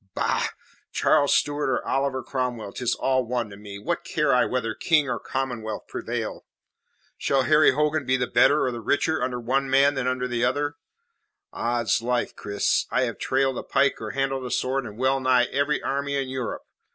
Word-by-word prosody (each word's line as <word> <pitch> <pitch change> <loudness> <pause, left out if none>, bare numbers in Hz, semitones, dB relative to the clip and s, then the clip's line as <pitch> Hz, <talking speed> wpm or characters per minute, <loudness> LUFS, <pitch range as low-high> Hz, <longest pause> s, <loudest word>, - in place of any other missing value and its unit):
Bah! - - +1 0.4
Charles 145 -1 +3
Stuart 145 -1 +1
or 130 - -1
Oliver 135 -1 0
Cromwell, 125 -5 -3
'tis 125 -2 -1
all 130 -1 +1
one 120 -2 -2
to - - -9
me. 100 -1 -9
What 135 +12 -3
care 150 -3 +1
I 125 - +4
whether 125 -3 -1
King 150 +4 +2
or - - -2
Commonwealth 120 -5 -4
prevail? - - -4 0.8
Shall 135 -1 +2
Harry 150 +3 +5
Hogan 150 +1 +1
be 130 0 +1
the 125 - 0
better 135 +5 +4
or 130 - 0
the 120 -1 -6
richer 160 +7 +1
under 125 -1 -1
one 135 +3 0
than 135 -1 +3
under 130 0 -1
the 120 -1 -1
other? 145 +4 0 0.8
Oddslife, 120 +1 0
Cris, 100 0 0
I 125 +2 +1
have 115 -3 -3
trailed 135 -1 +1
a - - -6
pike 140 -3 +1
or 110 - -4
handled 135 0 -1
a - - -4
sword 130 0 -1
in 105 0 -10
well 130 +2 +2
nigh 130 -1 +4
every 140 +1 0
army 140 +1 -1
in 135 -2 -1
Europe. 130 -3 -4
130 Hz, 185 wpm, -25 LUFS, 120-140 Hz, 0.8 s, Harry